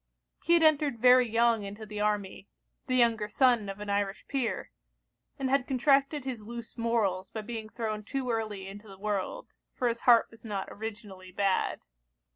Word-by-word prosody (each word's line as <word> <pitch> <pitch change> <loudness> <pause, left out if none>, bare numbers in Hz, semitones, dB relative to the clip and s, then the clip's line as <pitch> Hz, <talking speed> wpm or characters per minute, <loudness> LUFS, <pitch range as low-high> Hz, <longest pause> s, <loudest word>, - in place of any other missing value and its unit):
He 340 - +3
had 335 - +4
entered 295 -4 +3
very 250 +1 +6
young 230 -1 +3
into 205 +2 -7
the 210 0 -7
army; 205 -2 -1 0.4
the 255 - +1
younger 230 -4 +3
son 240 -3 +3
of 195 +1 -6
an 210 - -6
Irish 200 -1 -2
peer; 265 -4 -2 0.7
and 270 - -1
had 270 -1 +1
contracted 275 +2 +2
his 250 -4 -4
loose 235 +1 -8
morals 215 -5 0
by 220 - -5
being 220 0 -6
thrown 215 -2 -4
too 255 +2 -3
early 215 -4 -3
into 205 +2 -10
the 195 -1 -12
world; 205 -1 -3 0.2
for 250 - 0
his 235 0 -1
heart 235 -2 +5
was 225 - -17
not 205 -4 -4
originally 205 -4 -8
bad. 195 0 0
225 Hz, 175 wpm, -29 LUFS, 205-250 Hz, 0.7 s, very